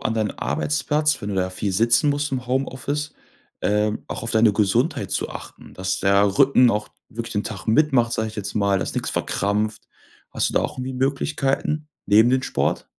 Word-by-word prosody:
an 110 - -1
deinen 110 -2 -1
Arbeitsplatz, 75 - 0
wenn 100 - -3
du 100 - -3
da 95 0 0
viel 95 +1 -2
sitzen 120 +8 +3
musst 145 0 -1
im 130 -1 -3
Homeoffice, 135 +3 -2 0.5
ähm, 105 +1 0
auch - - -5
auf 115 - -3
deine 110 -1 +4
Gesundheit 110 - +1
zu - - -2
achten? - - -10
Dass 95 0 -2
der 100 +3 +3
Rücken 130 -3 +6
auch 105 -1 -2 0.2
wirklich 115 +1 -6
den 105 -1 -1
Tag 110 -4 -6
mitmacht, 120 -1 +3
sag 110 - -1
ich 110 0 -8
jetzt 100 - -5
mal 100 -1 +2
dass 85 - -4
nix - - -2
verkrampft. 105 +1 -1 0.4
Hast - - 0
du - - -9
da - - +3
auch - - -4
irgendwie 130 +1 -4
Möglichkeiten 140 +2 -1 0.2
neben 110 +4 +5
dem 130 0 +2
Sport? - - -1
115 Hz, 195 wpm, -22 LUFS, 100-135 Hz, 0.5 s, Rücken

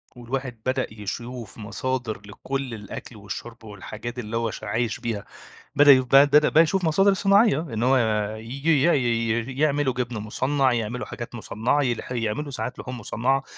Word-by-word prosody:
والواحد 125 -1 -5
بدأ 130 0 0
يشوف 115 +2 -6
مصادر 115 0 -3
لكل 130 +4 -5
الأكل 105 +2 -8
والشرب 105 +4 -8
والحاجات 110 +3 -7
اللي 115 0 -3
هو 115 -1 -1
ش - - -9
عايش 110 0 -1
بيها، 110 -4 -3 0.5
بدأ 145 0 +8
يو 130 -1 +6
بدأ 145 +4 +6
يشوف 180 +2 +1
مصادر 195 +5 +4
صناعية 200 -4 +4
إن 120 -9 -4
هو 130 +2 +4 0.4
ييجي 135 +6 0
ي 170 - +5
ي 120 0 0
يعملوا 145 -3 +2
جبن 125 -2 -3
مُصنّع، 130 +5 +1
يعملوا 120 +2 -2
حاجات 120 0 -7
مُصنّعة 120 +5 0
يلح 120 -1 -2
يعملوا 120 +4 -2
ساعات 125 -1 -5
لحوم 125 0 -6
مُصنّعة 130 +5 0
125 Hz, 155 wpm, -24 LUFS, 115-135 Hz, 0.5 s, بدأ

